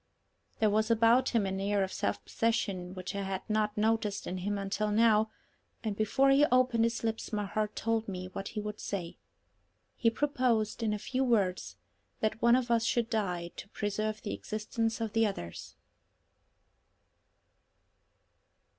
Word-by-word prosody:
There 215 -2 +3
was 215 +2 +2
about 230 +2 +4
him 230 -4 +1
an 190 0 -2
air 200 0 +1
of 190 - -4
self - - -2
possession 200 -6 -1
which 185 -1 -5
I 200 - -2
had 190 -1 -4
not 215 -1 0
noticed 215 -1 +1
in 185 - -4
him 205 +3 -2
until 200 +2 -1
now, 220 0 +4 0.5
and 215 -3 -2
before 265 +6 +3
he 275 +2 +5
opened 250 -3 +3
his 230 0 -2
lips 225 0 -2
my 210 -1 -1
heart 210 +2 -2
told 225 0 0
me 185 -2 -4
what 195 +2 -6
he 215 - -4
would 210 0 -5
say. 180 -4 -5 0.8
He 230 - +3
proposed, 240 -4 0
in 220 -2 +1
a 210 - 0
few 255 +5 -1
words, 200 -7 +1 0.4
that 220 +1 -1
one 235 0 +6
of 250 -2 0
us 230 -1 +3
should 235 0 0
die 180 -6 -1
to 200 - -8
preserve 215 +1 -2
the 205 - -3
existence 225 +1 -2
of 220 -2 -2
the 225 -1 +4
others. 85 - -7
215 Hz, 165 wpm, -31 LUFS, 200-230 Hz, 0.8 s, one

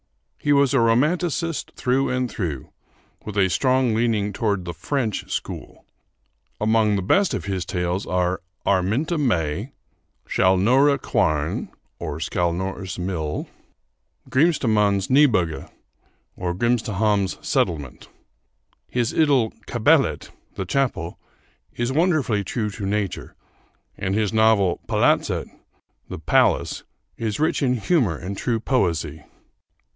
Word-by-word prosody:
He 145 - 0
was 140 -2 +4
a 135 - +4
romanticist 155 +8 +1
through 130 +2 +1
and 125 0 0
through, 85 - -5 0.5
with 105 -1 -6
a 95 -2 +3
strong 130 -1 +2
leaning 110 -3 0
toward 100 -4 -1
the 85 - -4
French 115 - -3
school. - - -6 0.7
Among 110 -1 +2
the 95 - -1
best 195 - +2
of - - -4
his 95 -3 -2
tales 90 +2 -2
are 90 0 0 0.2
'Araminta 110 - +1
May,' 100 - -1 0.5
'Skällnora 125 +10 +3
Quarn' 75 -7 0 0.3
(Skällnora's 90 +4 -2
Mill), 85 -5 -3 0.8
and - - -18
'Grimstahamns 110 - +2
Nybygge' 110 - +3 0.7
(Grimstahamn's 105 +1 0
Settlement). 70 -7 -1 0.8
His 120 -2 -1
idyl 140 -8 +3 0.2
'Kapellet' - - +2 0.2
(The 95 - -3
Chapel) 100 -6 -1 0.6
is 120 +1 -1
wonderfully 150 - +1
true 105 +1 -2
to 100 0 -5
nature, 100 -1 -3 0.6
and 95 +1 -2
his 105 -1 0
novel 110 -5 +3
'Palatset' - - +1 0.5
(The - - -5
Palace) - - +2 0.3
is 110 0 -3
rich 155 +1 +1
in 125 -2 +2
humor 115 - +1
and 95 +5 -6
true 115 +3 -1
poesy. 85 - -1
105 Hz, 110 wpm, -23 LUFS, 90-130 Hz, 0.8 s, was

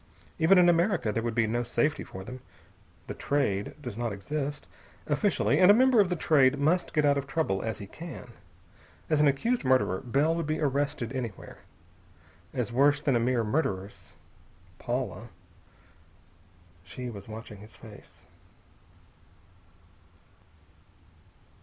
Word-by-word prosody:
Even 170 +4 +5
in 180 -1 +6
America 170 - +2
there 115 - -1
would 115 -1 -3
be 115 - +3
no 120 +2 -1
safety 145 +5 0
for 95 - -9
them. 125 +4 -9 0.7
The - - -6
Trade 105 -9 -1
does 120 -6 -7
not 120 -2 -1
exist, 145 +8 -4 0.4
officially, 115 +9 +1
and 185 0 +7
a 205 - +8
member 255 -1 +4
of 200 -3 +4
the 180 - 0
Trade 140 -5 +3
must 160 +6 +1
get 150 -1 +3
out 140 -1 +3
of 140 - -7
trouble 135 -10 -1
as 110 -1 -3
he 100 - -8
can. 145 - -10 0.8
As 155 - +3
an 150 - +5
accused 225 - 0
murderer, 130 -8 +2
Bell 140 +6 +1
would 165 -2 -3
be 155 0 -1
arrested 140 -3 -1
anywhere. 120 -7 -6 0.9
As 120 - -3
worse 140 +3 +4
than 145 -3 +1
a - - +3
mere 120 0 +1
murderess, 105 -6 -3 0.6
Paula.... - - -4 1.5
She 120 +8 -7
was 100 -3 -10
watching 110 -1 -9
his 105 +2 -13
face. 110 -3 -14
135 Hz, 140 wpm, -28 LUFS, 115-155 Hz, 1.5 s, a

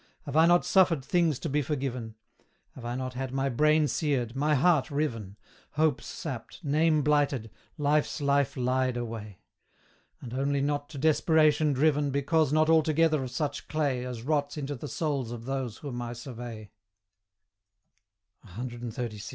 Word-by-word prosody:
Have 140 -1 -6
I 160 +1 +6
not 175 0 +4
suffered 170 -8 +3
things 165 -3 +2
to - - -5
be 150 0 +1
forgiven? 130 -5 -3 0.6
Have 130 - -11
I 120 +1 -3
not 130 0 -4
had 130 0 -4
my 135 +1 0
brain 150 +4 +3
seared, 130 -4 -1
my 150 +2 +2
heart 155 0 +3
riven, 115 -10 -3 0.4
Hopes 155 0 +1
sapped, 135 +3 -7
name 155 +1 +3
blighted, 140 -6 +1 0.3
Life's 150 +1 +1
life 140 -1 +1
lied 130 0 0
away? 110 -4 -6 0.8
And 120 -2 -9
only 140 +2 0
not 145 +1 -1
to 150 - -9
desperation 155 0 +3
driven, 145 +1 +2
Because 140 +2 +1
not 155 +1 +3
altogether 160 -1 +3
of 130 - -4
such 140 +2 -3
clay 140 -5 -1
As 125 -2 -6
rots 145 +1 -1
into 145 -1 -3
the 140 +2 -7
souls 140 -7 -2
of 115 -1 -7
those 130 -4 -3
whom 125 -5 -6
I 120 0 -4
survey. 120 -3 -8 1.7
CXXXVI. 120 +1 -6
140 Hz, 150 wpm, -28 LUFS, 125-150 Hz, 1.7 s, I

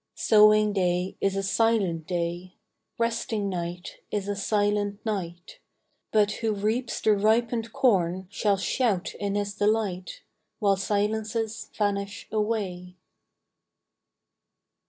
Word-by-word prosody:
Sowing 215 -1 +5
day 180 -1 0
is 195 -1 +1
a 195 - -1
silent 195 -5 +1
day, 175 +1 -3 0.4
Resting 225 -3 -1
night 175 -1 -5
is 205 -2 -2
a 205 - -1
silent 205 0 0
night; 175 -5 -4 0.5
But 210 -1 +3
who 220 -2 0
reaps 220 +5 -1
the 215 - +4
ripened 225 +2 +1
corn 190 -7 +2
Shall 205 -1 +1
shout 205 -2 0
in 200 -1 -2
his 205 0 -1
delight, 205 -4 -1 0.3
While 200 -2 +3
silences 220 +2 -1
vanish 200 -1 -2
away. 195 -5 -2
205 Hz, 110 wpm, -26 LUFS, 185-220 Hz, 0.5 s, Sowing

